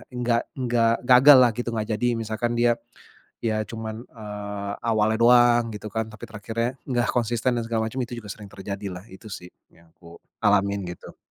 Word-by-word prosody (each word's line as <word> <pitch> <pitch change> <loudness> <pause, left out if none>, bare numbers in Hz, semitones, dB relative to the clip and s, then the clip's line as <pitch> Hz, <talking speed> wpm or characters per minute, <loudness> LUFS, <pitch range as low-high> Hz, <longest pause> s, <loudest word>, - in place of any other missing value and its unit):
nggak 120 -1 0 0.2
nggak 115 -2 +2
gagal 130 +2 +8
lah, 125 -1 +6
gitu 120 0 -4
nggak 110 -2 -2
jadi, 115 +3 0
misalkan 115 +2 -2
dia 120 0 +4 0.7
ya 110 -1 0
cuman, 110 +1 -6
eee, 105 -2 -6
awalnya 110 0 +2
doang, 120 0 +6
gitu 105 +1 -7
kan. 110 +1 -2
Tapi 110 -2 -14
terakhirnya 115 +3 -3 0.2
nggak 120 -4 0
konsisten 120 +1 0
dan 115 - -2
segala 115 -1 -1
macam 125 - -10
itu 120 - -10
juga 105 - -11
sering 105 0 -8
terjadilah, 100 0 -7
itu 95 +3 -14
sih 90 -4 -8 0.2
yang 85 0 -23
aku 85 0 -16 0.2
alamin, 100 -2 +2
gitu. 90 - -10
110 Hz, 175 wpm, -24 LUFS, 105-120 Hz, 0.7 s, gagal